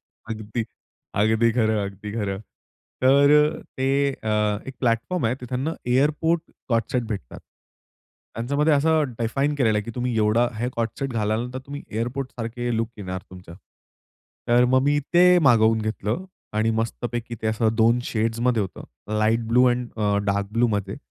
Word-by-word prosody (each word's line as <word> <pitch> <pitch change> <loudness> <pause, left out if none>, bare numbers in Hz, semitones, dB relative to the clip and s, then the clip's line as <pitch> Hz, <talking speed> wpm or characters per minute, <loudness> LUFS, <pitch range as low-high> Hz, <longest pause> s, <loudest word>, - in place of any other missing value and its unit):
अगदी 110 +1 -6 0.6
अगदी 110 +2 +3
खरं, 110 -3 +1
अगदी 100 +1 -7
खरं. 100 -3 -3 0.6
तर 140 +2 +6 0.3
अ, - - -11
ते 130 0 0 0.2
अ, 110 -4 -3 0.3
एक 135 - -7
प्लॅटफॉर्म 120 +6 0
आहे, 120 - +1
तिथंना 130 +6 -2 0.2
एअरपोर्ट 155 +4 +2 0.3
को-ऑर्ड 115 -2 +2
सेट 125 - +2
भेटतात. 100 - -7 0.9
त्यांच्यामध्ये 140 +7 +1
असं 155 +2 +3 0.2
डिफाइन 135 +6 0
केलेलं 110 -6 +2
आहे, - - -2
की 115 - -6
तुम्ही 125 -2 -1
एवढं 110 +3 +3
हे 125 - 0
को-ऑर्ड 115 -1 0
सेट 135 -2 -2
घालाल 110 +2 -1
तुम्ही 140 +2 -7
एअरपोर्ट 125 +4 -3
सारखं 120 +1 -4
लूक 115 0 0
येणार 95 -1 -5
तुमचा. 90 -2 -11 0.9
तर 120 +1 +5
मग 130 - +4
मी 145 +1 +2 0.2
ते 180 +1 +7 0.2
मागवून 110 -2 +4
घेतलं 110 - -2 0.3
आणि 110 +1 +2
मस्तपैकी 120 +1 -4
ते - - -1
असं 110 0 +1
2 115 +1 +4
शेड्समध्ये 115 0 0
होतं, 95 - -7 0.3
लाईट 115 +2 +2
ब्लू 125 +2 +5
आणि 120 0 -1
अ, 105 -1 +1
डार्क 100 0 -1
ब्लूमध्ये. 105 -3 0
115 Hz, 155 wpm, -24 LUFS, 110-130 Hz, 0.9 s, ते